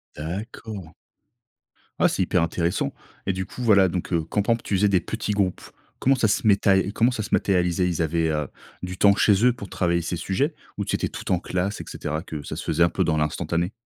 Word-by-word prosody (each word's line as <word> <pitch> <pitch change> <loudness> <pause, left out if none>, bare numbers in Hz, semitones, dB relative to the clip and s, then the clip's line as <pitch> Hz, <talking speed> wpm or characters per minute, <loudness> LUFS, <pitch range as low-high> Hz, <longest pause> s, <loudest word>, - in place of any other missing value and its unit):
D'accord. 95 +2 -6 1.1
Ah, - - +5
c'est - - 0
hyper 90 - +1
intéressant. 85 +1 -1 0.3
Et 95 - 0
du 95 0 -3
coup 125 - -9
voilà, 100 -5 +5
donc, 90 +1 -4
heu, 80 -2 +2
quand 105 - +1
pampe, 115 +2 0
tu 100 - -1
faisais, 100 +2 +3
des 95 -2 +4
petits 110 -2 -3
groupes. 95 -3 0 0.4
Comment 135 +1 +3
ça 120 -3 +2
se 105 +2 +1
metaé 100 -1 +4
comment 115 +4 +2
ça 110 - -3
se 105 - -5
matérialisait? 90 -1 +2
Ils 85 -2 -1
avaient, 80 0 +1
heu, 75 -2 -1 0.3
du 90 0 -5
temps 100 -1 +5
chez 105 +3 +4
eux 125 - +5
pour 100 -5 -9
travailler 85 -1 0
ces 85 +1 -3
sujets, 115 - -1 0.2
ou 100 - -1
c'était - - -1
tout - - -6
en 90 - +3
classe, 95 +3 -2
et - - -6
cetera, 80 +2 -4
que 75 -6 -6
ça - - -6
se - - -5
faisait 85 - +2
un 85 - +4
peu 95 - 0
dans 80 -1 +1
l'instantané? 85 +4 -1
95 Hz, 225 wpm, -24 LUFS, 85-105 Hz, 1.1 s, Ah